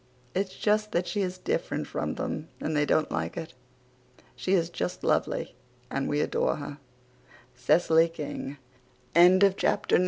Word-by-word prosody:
It's 190 Hz, 0 st, -2 dB
just 215 Hz, 0 st, +1 dB
that 175 Hz, +1 st, +1 dB
she 205 Hz, -, -2 dB
is 185 Hz, -1 st, -2 dB
different 455 Hz, -, -2 dB
from -, -, -3 dB
them 155 Hz, -, -4 dB
and 155 Hz, -, -2 dB
they 145 Hz, 0 st, +2 dB
don't 155 Hz, -, +2 dB
like 80 Hz, +1 st, -2 dB
it. 165 Hz, +1 st, -6 dB, 0.8 s
She 185 Hz, -, -1 dB
is 170 Hz, -3 st, +2 dB
just -, -, -3 dB
lovely -, -, 0 dB, 0.4 s
and 135 Hz, -, -1 dB
we 145 Hz, 0 st, +1 dB
adore -, -, +1 dB
her.) 145 Hz, 0 st, -7 dB, 0.8 s
CECILY 160 Hz, +5 st, +4 dB
KING. 145 Hz, -3 st, -6 dB, 0.6 s
CHAPTER 185 Hz, +3 st, +5 dB
X. -, -, +2 dB
170 Hz, 150 wpm, -28 LUFS, 145-190 Hz, 0.8 s, CHAPTER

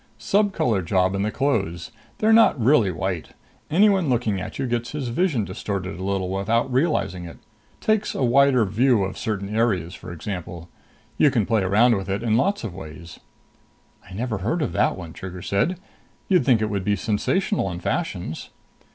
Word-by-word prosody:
"Subcolor 165 Hz, -, +1 dB
job 95 Hz, +2 st, +1 dB
in 100 Hz, -, -1 dB
the 105 Hz, -, 0 dB
clothes. 100 Hz, -, -1 dB, 0.3 s
They're 220 Hz, +1 st, +3 dB
not 225 Hz, -, +5 dB
really 120 Hz, -3 st, +4 dB
white. 90 Hz, -1 st, -4 dB, 0.4 s
Anyone 190 Hz, -1 st, +3 dB
looking 115 Hz, -6 st, 0 dB
at -, -, -7 dB
you -, -, -2 dB
gets 120 Hz, 0 st, -2 dB
his 140 Hz, -5 st, -3 dB
vision 130 Hz, -, 0 dB
distorted 95 Hz, -1 st, -4 dB
a -, -, -5 dB
little 95 Hz, -1 st, -1 dB
without 115 Hz, +6 st, 0 dB
realizing 125 Hz, -, 0 dB
it. 85 Hz, -, -10 dB, 0.4 s
Takes 215 Hz, -1 st, 0 dB
a -, -, -1 dB
wider 130 Hz, -1 st, +4 dB
view 110 Hz, +2 st, +2 dB
of 95 Hz, 0 st, -4 dB
certain 105 Hz, -1 st, -3 dB
areas, 95 Hz, -7 st, 0 dB
for -, -, -9 dB
example. 85 Hz, -1 st, -6 dB, 0.5 s
You 150 Hz, -, +6 dB
can 120 Hz, -6 st, +1 dB
play 110 Hz, 0 st, +1 dB
it -, -, -1 dB
around 110 Hz, +6 st, +4 dB
in 105 Hz, -, +1 dB, 0.2 s
a 115 Hz, -, -1 dB
lot 170 Hz, -, +1 dB
of 110 Hz, -6 st, -5 dB
ways." 85 Hz, -1 st, -10 dB, 0.9 s
"I -, -, -11 dB
never 110 Hz, -1 st, -2 dB
heard 150 Hz, -, -1 dB
of 135 Hz, -, -2 dB
that -, -, +1 dB
one," 85 Hz, -3 st, -8 dB
Trigger 90 Hz, -1 st, -8 dB
said. 100 Hz, -, 0 dB, 0.5 s
"You'd 185 Hz, -4 st, +3 dB
think 115 Hz, -5 st, +4 dB
it 110 Hz, -, -1 dB
would 100 Hz, -2 st, -2 dB
be 105 Hz, +1 st, +1 dB
sensational 115 Hz, -, 0 dB
in 85 Hz, -1 st, -5 dB
fashions." 90 Hz, -, -3 dB
110 Hz, 180 wpm, -23 LUFS, 95-135 Hz, 0.9 s, You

